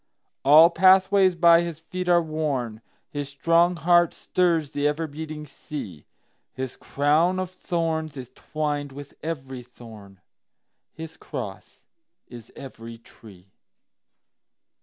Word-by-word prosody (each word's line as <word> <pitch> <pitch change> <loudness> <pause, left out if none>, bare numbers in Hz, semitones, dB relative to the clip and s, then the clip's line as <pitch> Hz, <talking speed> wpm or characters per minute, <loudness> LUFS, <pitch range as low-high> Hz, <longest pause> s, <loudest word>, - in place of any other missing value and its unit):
All 155 +5 +7
pathways 190 +1 +4
by 170 0 +6
his 170 -2 -5
feet 180 +2 -5
are 175 -1 +4
worn, 140 -8 -3 0.3
His 145 -1 -5
strong 165 +5 +2
heart 175 +1 +3
stirs 165 -5 0
the 145 -1 0
ever 150 +2 -1
beating 155 0 -7
sea, 130 - -9 0.5
His 130 -1 -5
crown 155 +6 +1
of 185 -1 -4
thorns 160 -4 -3
is 130 -1 -8
twined 145 -2 -4
with 145 0 -10
every 135 -5 -6
thorn, 110 -5 -14 0.7
His 160 0 -10
cross - - -8 0.4
is 120 -2 -13
every 115 -3 -10
tree. 100 -5 -17
155 Hz, 115 wpm, -24 LUFS, 130-170 Hz, 0.7 s, All